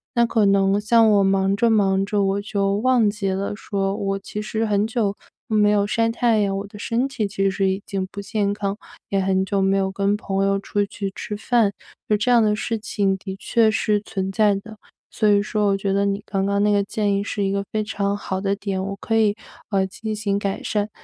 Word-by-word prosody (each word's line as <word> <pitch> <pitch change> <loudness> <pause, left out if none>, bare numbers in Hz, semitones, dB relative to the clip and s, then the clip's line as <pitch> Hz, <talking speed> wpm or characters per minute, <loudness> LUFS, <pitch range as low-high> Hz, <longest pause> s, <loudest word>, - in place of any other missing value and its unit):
那 235 0 +4
可 225 -2 +2
能 195 0 +3
像 225 +1 +4
我 205 -2 +4
忙 195 0 +2
着 230 +3 +2
忙 195 -3 +2
着， 205 0 0
我 195 +1 0
就 200 -1 0
忘 235 0 +3
记 205 -1 -2
了 195 +2 -2
说， 195 -2 -2
我 195 -1 -2
其 210 +2 -6
实 220 +1 -2
很 205 -1 +1
久， 220 -3 -1 0.3
嗯， 215 - +1
没 210 0 +4
有 205 -1 +2
晒 230 +1 +1
太 230 -1 +2
阳， 200 -2 0
我 200 +1 -5
的 205 - -12
身 230 +4 -1
体 255 -6 -2
其 195 0 0
实 195 0 0
已 190 +1 -2
经 195 -1 -3
不 200 - -7
健 200 0 -1
康， 200 -1 -3 0.3
也 195 - +1
很 190 0 +1
久 195 +1 0
没 195 0 +2
有 190 -1 +1
跟 200 +1 +1
朋 195 -2 -1
友 195 0 +1
出 205 +1 -1
去 200 0 -5
吃 210 - -5
饭， 225 -2 +2 0.4
就 210 - +3
这 205 +4 -1
样 240 -2 +5
的 210 -1 +2
事 225 +1 -2
情 205 -3 0
的 190 0 -7
确 225 +1 +2
是 210 0 +1
存 195 -2 -4
在 210 0 +3
的。 215 +2 -8 0.3
所 215 - +1
以 205 -1 +4
说 210 0 -1
我 200 - +3
觉 195 0 -2
得 200 0 +2
你 200 0 -1
刚 195 -1 -1
刚 200 0 +1
那 210 - +3
个 200 0 +2
建 205 0 -1
议 200 - -1
是 205 0 -3
一 195 - 0
个 200 0 -1
非 215 - 0
常 200 -1 -1
好 190 -2 -4
的 195 0 0
点， 195 -2 -3
我 195 +1 -4
可 225 - -2
以， 210 -2 +3 0.4
呃， 190 -1 +2
进 215 +3 -5
行 205 -1 -1
改 200 -1 -3
善。 210 -1 -1
200 Hz, 255 characters per minute, -22 LUFS, 195-215 Hz, 0.4 s, 样